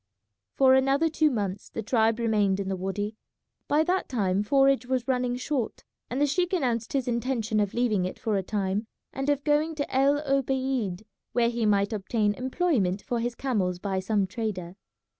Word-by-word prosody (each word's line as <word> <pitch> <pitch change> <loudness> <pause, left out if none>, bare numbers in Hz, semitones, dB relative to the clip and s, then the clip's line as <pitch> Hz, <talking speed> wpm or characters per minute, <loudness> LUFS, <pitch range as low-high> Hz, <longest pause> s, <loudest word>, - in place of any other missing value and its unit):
For 265 -1 +5
another 270 +4 +3
two 310 0 +2
months 205 -6 -3
the 225 - -5
tribe 225 0 +2
remained 210 -4 +1
in 195 -1 -3
the 190 - -1
wady. 205 +3 -3 0.5
By 300 +2 +3
that 365 +3 0
time 200 -6 +1
forage 270 +3 +3
was 255 -1 -1
running 250 -2 0
short, 250 -2 -3 0.3
and 255 - -2
the 290 - +4
sheik 355 +6 0
announced 240 - 0
his 270 -3 0
intention 235 -3 0
of 205 -2 -1
leaving 220 -6 +1
it 185 - -5
for 220 -2 -1
a 195 - +1
time 200 +2 -2 0.3
and 270 +1 -2
of 285 -1 +1
going 305 +2 +1
to 285 -3 -3
El 275 +2 +4
Obeid, 260 -7 0 0.3
where 235 -1 +3
he 230 -2 0
might 200 +1 +2
obtain 210 +1 0
employment 250 - 0
for 240 - -2
his 240 +1 -2
camels 200 -10 -1
by 190 +1 -2
some 200 +1 +1
trader. 190 -4 -4
235 Hz, 180 wpm, -27 LUFS, 205-270 Hz, 0.5 s, For